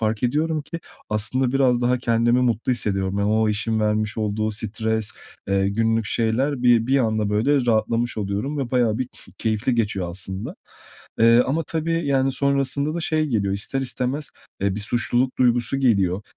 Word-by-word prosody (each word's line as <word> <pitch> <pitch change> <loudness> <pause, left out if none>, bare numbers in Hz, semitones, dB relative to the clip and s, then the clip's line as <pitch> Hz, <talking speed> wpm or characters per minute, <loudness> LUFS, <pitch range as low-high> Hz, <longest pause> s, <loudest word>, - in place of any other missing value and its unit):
fark 110 0 -1
ediyorum 150 +4 0
ki, 165 +2 -7 0.3
aslında 120 +5 0
biraz 130 -3 +3
daha 125 +1 +2
kendimi 120 +1 +2
mutlu 120 0 +1
hissediyorum. 95 -4 -1
Yani, 100 +1 +1
o 110 0 +2
işin 110 +1 -1
vermiş 105 0 0
olduğu 110 0 -1
stres, 110 -1 -2 0.4
eee, 100 0 +2
günlük 115 +1 0
şeyler 125 +5 0
bir 120 -2 +4
bir 135 +1 +3
anda, 110 -3 0
böyle, 125 +5 +2
rahatlamış 115 +1 +1
oluyorum 105 +9 -3
ve 130 -4 -3
bayağı 120 -3 +1
bir 130 - -1
ke - - -19
keyifli 110 +3 0
geçiyor 100 -6 -1
aslında. 95 +2 -5 0.7
Iıı, 115 +2 +6
ama, 155 +5 0
tabii, 165 0 -2
yani, 135 -1 +2
sonrasında 140 +2 0
da 170 - -2
şey 155 -2 0
geliyor 100 -8 0
ister 135 +7 -1
istemez, 135 +3 -3 0.3
eee, 100 -1 0
bir 105 - -4
suçluluk 120 +3 0
duygusu 120 +1 +2
geliyor. 100 -7 +2
115 Hz, 170 wpm, -22 LUFS, 105-130 Hz, 0.7 s, Iıı